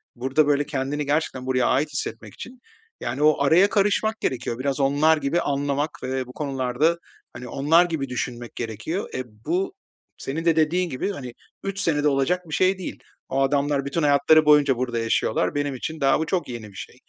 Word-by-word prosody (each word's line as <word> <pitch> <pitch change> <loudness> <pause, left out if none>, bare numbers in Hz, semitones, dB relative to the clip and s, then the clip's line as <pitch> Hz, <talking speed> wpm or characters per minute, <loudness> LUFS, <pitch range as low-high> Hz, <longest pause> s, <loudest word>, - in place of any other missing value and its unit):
burada, 135 +5 +1
böyle, 145 0 +2
kendini 145 +1 -2
gerçekten 145 -3 -1
buraya 130 -2 +1
ait 145 +4 +2
hissetmek - - -5
için, 250 0 -10 0.4
yani, 145 - -3
o 155 -1 +4
araya 175 +8 +5
karışmak 210 +2 +1
gerekiyor, 125 -1 -2
biraz 140 +1 -1
onlar 145 +3 +3
gibi 150 +4 0
anlamak 145 +1 -1
ve 130 0 -2
bu 125 - -11
konularda, 135 +3 0 0.4
hani, 125 +1 -8
onlar 155 +8 +3
gibi 155 -6 -3
düşünmek 120 -1 -5
gerekiyor. 120 - -4
Eee, 130 - -2 0.2
bu 180 - -1 0.4
senin 160 +5 -4
de 165 -2 +4
dediğin 170 +3 +1
gibi, 145 +8 -2
hani, 130 -10 -7 0.3
3 195 0 -4
senede 150 -6 +1
olacak 140 +6 +1
bir - - -6
şey 185 +3 +2
değil. 185 - -7 0.3
O 135 - 0
adamlar 140 0 +1
bütün 150 +4 -2
hayatları 150 +2 +5
boyunca 145 -3 +5
burada 120 -2 -2
yaşıyorlar. 115 +2 0
Benim 145 -1 -1
için 160 +5 -6
daha 135 +1 +3
bu 160 - -1
çok 175 -3 -2
yeni 115 -3 -7
bir 100 - -18
şey. - - -8
145 Hz, 185 wpm, -24 LUFS, 130-160 Hz, 0.4 s, araya